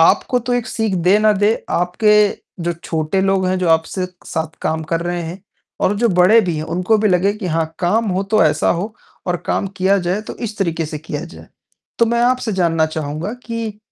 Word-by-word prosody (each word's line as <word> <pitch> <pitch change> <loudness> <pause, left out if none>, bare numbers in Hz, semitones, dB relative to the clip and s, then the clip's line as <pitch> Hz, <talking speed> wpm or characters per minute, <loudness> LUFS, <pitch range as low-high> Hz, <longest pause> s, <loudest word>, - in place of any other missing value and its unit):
आपको 245 +9 +4
तो 245 +1 -3
एक 245 -2 -1
सीख 220 -3 -1
दे 195 +3 +6
ना 215 0 +4
दे, 205 +2 +2 0.2
आपके 180 +5 +2 0.5
जो 175 - 0
छोटे 160 +4 -1
लोग 195 -1 +2
हैं, 185 0 0
जो 180 -2 0
आपसे 165 +3 +1 0.2
साथ 160 0 -4
काम 160 0 -1
कर 165 0 +1
रहे 175 0 -2
हैं। 170 +3 -7 0.4
और 200 - +2
जो 235 +1 +3
बड़े 185 +4 +5
भी 175 -6 -2
हैं 155 - -3
उनको 185 +5 +2
भी 215 0 +2
लगे 190 +2 +3
कि 210 -3 -5
हाँ 165 -1 0
काम 210 +5 +1
हो 190 - +1
तो 215 - +5
ऐसा 155 -1 +2
हो 215 +3 -5 0.3
और 180 -1 +1
काम - - 0
किया 195 +2 +3
जाए 185 +4 0
तो - - -6
इस 215 -1 -7
तरीके 165 -4 -1
से 150 0 -5
किया 150 0 -5
जाए। 170 - -13 0.5
तो 230 - +4
मैं 235 +1 +1
आपसे 250 -2 +1
जानना 165 -4 +2
चाहूँगा 155 +4 -4
कि 230 -3 -4
185 Hz, 215 wpm, -18 LUFS, 165-215 Hz, 0.5 s, दे